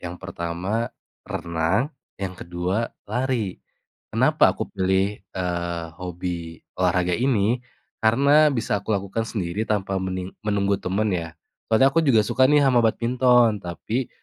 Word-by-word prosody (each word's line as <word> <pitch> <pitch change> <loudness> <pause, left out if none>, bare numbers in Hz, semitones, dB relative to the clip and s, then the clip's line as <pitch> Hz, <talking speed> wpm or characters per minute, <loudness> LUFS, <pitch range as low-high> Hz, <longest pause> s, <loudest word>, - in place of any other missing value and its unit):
yang 90 0 -6
pertama 95 +5 -3 0.4
renang, 85 - -1 0.2
yang 95 -2 -4
ke-2 90 +5 -2 0.2
lari. 115 -3 -2 0.5
Kenapa - - +4
aku - - -1
pilih, 95 +1 0
eee, 85 -3 -3
hobi 85 -2 -5 0.2
olahraga 90 -1 +1
ini? 120 +1 +1 0.4
Karena 140 +7 +5
bisa 115 -6 -1
aku 105 0 0
lakukan 100 +3 -3
sendiri 100 +1 -3
tanpa 95 -2 0
mening 95 0 -4
menunggu 100 -1 0
teman 100 +2 0
ya. 85 -2 -4 0.3
Soalnya 130 +5 +4
aku 165 - +4
juga 120 -9 +4
suka 130 +3 +3
nih 145 -1 +5
sama 125 -3 +4
badminton, 120 -1 +3
tapi 110 +8 -3
100 Hz, 130 wpm, -24 LUFS, 90-115 Hz, 0.5 s, Karena